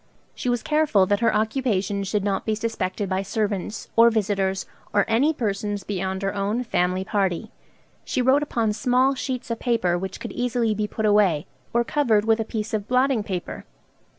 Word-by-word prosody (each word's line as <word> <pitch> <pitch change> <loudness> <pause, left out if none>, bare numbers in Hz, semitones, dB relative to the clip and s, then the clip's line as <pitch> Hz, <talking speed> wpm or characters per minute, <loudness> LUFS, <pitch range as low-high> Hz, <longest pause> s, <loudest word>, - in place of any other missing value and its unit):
She 250 - -3
was 240 -2 0
careful 300 -11 +3
that 205 +2 +1
her 230 - +3
occupation 210 -3 0
should 200 +1 -1
not 195 -1 -1
be 220 - 0
suspected 210 -3 -2
by 190 0 0
servants, 205 0 -3
or 230 +1 +7
visitors, 195 -3 0 0.3
or 205 - +3
any 245 +8 +3
persons 205 - -2
beyond 190 0 -3
her 195 - -1
own 205 +4 -1
family 185 -4 0
party. 195 0 -1 0.5
She - - -2
wrote 260 +3 +4
upon 230 -7 0
small 250 +5 +2
sheets 255 -2 -4
of 230 - -2
paper 185 -8 +1
which 190 0 -5
could - - -6
easily 245 -2 0
be 210 0 -1
put 220 +1 -3
away, 200 -8 +3 0.3
or 235 0 +2
covered 235 -6 +2
with 225 0 +3
a - - +1
piece 220 0 -4
of 210 -2 -2
blotting 255 -1 +2
paper. 185 -3 -5
215 Hz, 180 wpm, -24 LUFS, 195-235 Hz, 0.5 s, or